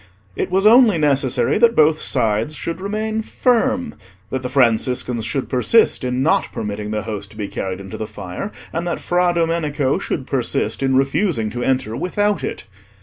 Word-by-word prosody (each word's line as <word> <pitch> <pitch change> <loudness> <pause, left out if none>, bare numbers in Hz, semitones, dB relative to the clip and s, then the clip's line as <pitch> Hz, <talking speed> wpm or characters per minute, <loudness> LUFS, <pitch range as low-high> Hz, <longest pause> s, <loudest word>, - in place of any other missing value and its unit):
It - - -2
was 190 +2 +1
only 225 -3 +6
necessary 135 - +2
that 235 0 +4
both 155 0 +4
sides 110 +7 0
should 165 +5 -4
remain 215 +2 -2
firm—that 220 - -2
the 125 - -4
Franciscans 125 -1 +1
should 125 +4 -2
persist 145 - +3
in 125 +1 -1
not 160 - +1
permitting 105 0 -4
the 105 -1 -2
Host 105 -2 -5
to 105 - -16
be 105 -2 -3
carried 95 -1 -4
into 95 -1 -8
the 110 - -4
fire, 100 - -6 0.2
and 170 +1 -2
that 170 - -2
Fra 175 0 +1
Domenico 160 -5 0
should 130 - -3
persist 130 0 -1
in 135 -1 +1
refusing 135 - +1
to 120 +2 -4
enter 125 -3 0
without 205 - 0
it. - - -4
135 Hz, 170 wpm, -20 LUFS, 110-180 Hz, 0.2 s, only